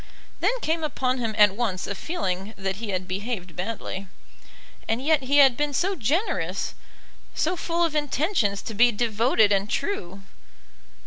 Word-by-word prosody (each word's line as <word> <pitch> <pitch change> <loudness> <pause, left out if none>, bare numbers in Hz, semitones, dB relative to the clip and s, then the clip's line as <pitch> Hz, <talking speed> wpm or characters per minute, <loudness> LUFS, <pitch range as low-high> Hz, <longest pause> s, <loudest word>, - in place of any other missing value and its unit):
Then - - +1
came 320 +1 0
upon 260 -3 -1
him 225 -3 -2
at 205 -2 +6
once 205 -5 -1
a - - -3
feeling 200 - -3
that 195 0 -3
he 220 0 -5
had 185 -1 -2
behaved 185 -2 -4
badly; 195 0 -4 0.8
and 225 +1 0
yet 300 +2 +2
he 275 +2 +1
had 270 -4 +7
been 290 +1 -1
so 385 +7 +1
generous, 260 - -1 0.6
so 350 +4 +1
full 340 0 0
of 325 - -2
intentions 295 - 0
to 225 - -5
be 240 +3 +5
devoted 220 -1 +2
and 200 +1 +1
true! 195 - -3
230 Hz, 155 wpm, -25 LUFS, 200-295 Hz, 0.8 s, had